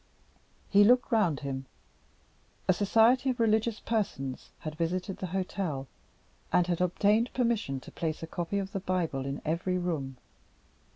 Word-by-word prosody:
He 205 0 +7
looked 245 +4 +4
round 195 -11 +2
him. 135 -1 -4 1.0
A 185 - +6
society 230 +7 +4
of 255 -1 -1
religious 220 0 +2
persons 135 - -2
had 155 - -5
visited 180 +4 -2
the 185 - -4
hotel, 180 -6 -3 0.6
and 180 - +4
had 175 0 -1
obtained 210 +6 +2
permission 230 - 0
to - - -12
place 160 -1 -3
a - - -1
copy 175 +4 -3
of 195 -1 -3
the 195 - -2
Bible 170 -8 -1
in 140 +1 -4
every 170 +4 0
room. 155 -7 -3
180 Hz, 150 wpm, -29 LUFS, 155-215 Hz, 1.0 s, He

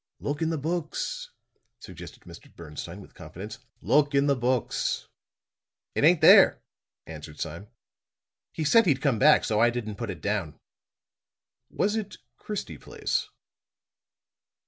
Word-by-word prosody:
"Look 145 +2 -4
in 160 - +1
the 165 - -1
books," 160 +2 -3 0.5
suggested - - -11
Mr. - - -14
Bernstine 85 +4 -8
with - - -16
confidence. 90 +6 -9 0.2
"Look 145 -1 +2
in 140 0 +3
the 140 -1 +3
books." 125 -1 -1 0.9
"It - - -1
ain't - - +5
there," - - +7 0.4
answered 75 -1 -10
Sime. 85 +7 -6 0.8
"He 160 - -4
said 225 +7 +5
he'd 140 -5 +3
come 130 -5 +1
back, 150 +4 +6
so 105 -1 0
I 120 - +5
didn't 110 -4 -5
put 115 -3 -4
it - - -6
down." 100 -7 -3 1.1
"Was 205 +2 0
it 215 -2 -4 0.2
Christie 210 -1 -6
Place?" - - -3
125 Hz, 135 wpm, -26 LUFS, 100-150 Hz, 1.1 s, there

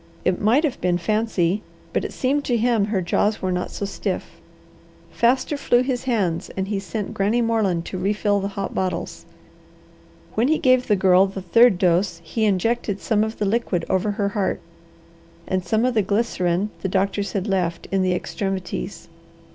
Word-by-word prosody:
It 185 -1 +1
might 235 +9 +3
have 290 -6 -1
been 180 -1 +2
fancy, 210 -1 0 0.3
but - - 0
it - - -4
seemed 280 +3 0
to 245 - +1
him 230 -2 +2
her 200 -3 -1
jaws 205 +4 +1
were 185 - -1
not 180 0 -2
so 200 - -4
stiff. 200 - -4 0.7
Faster 255 +5 +2
flew 245 -3 +3
his 255 -1 -2
hands 200 -10 0
and 190 0 -2
he 205 -2 -1
sent 205 +1 -5
Granny 205 +5 +1
Moreland 215 -7 +1
to 185 - -5
refill 205 +1 +1
the 195 - -2
hot 195 - -3
bottles. 185 -2 -3 1.1
When 230 +4 +2
he 315 +2 +3
gave 255 -3 +3
the 210 - +4
Girl 185 0 +5
the 195 -1 -7
third 230 +2 +5
dose 175 0 +1
he 220 +7 -1
injected 205 +1 0
some 215 -2 +1
of 220 +1 -4
the 210 - -1
liquid 200 -4 0
over 190 +2 +1
her 200 -1 0
heart 200 -1 -1 0.9
and 185 0 -1
of 235 +3 +2
the 220 - +3
glycerine 200 -2 0
the 190 - -2
doctors 195 +2 0
had 195 -2 -1
left, 180 -5 -1
in 195 0 +2
the 185 -1 +2
extremities. 185 - -4
200 Hz, 180 wpm, -22 LUFS, 185-230 Hz, 1.1 s, Girl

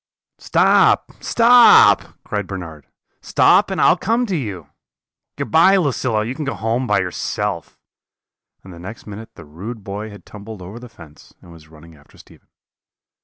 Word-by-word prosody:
"'Stop, - - +2
stop!' 240 +1 +5
cried 105 -2 -5
Bernard; 80 -6 -9 0.3
'stop - - +3
and - - -4
I - - +4
will - - +3
come 230 +4 -1
to 195 -5 -3
you. 100 - -6 0.7
Good - - -6
bye, 185 +5 +5
Lucilla, 125 - -1
you 120 - -4
can 150 +3 -6
go 140 - -4
home 115 +4 -2
by 105 -2 +1
yourself;' 90 -2 -4 0.9
and 95 - -13
the 85 - -13
next 100 +6 -10
minute 105 +2 -11
the - - -13
rude 100 +9 -9
boy 100 +3 -7
had 105 -1 -14
tumbled 105 -2 -11
over 100 +6 -10
the 125 0 -13
fence, 85 -8 -18
and 85 - -17
was 80 -2 -16
running 80 +1 -17
after 70 -1 -23
Stephen. - - -20
105 Hz, 170 wpm, -18 LUFS, 90-125 Hz, 0.9 s, stop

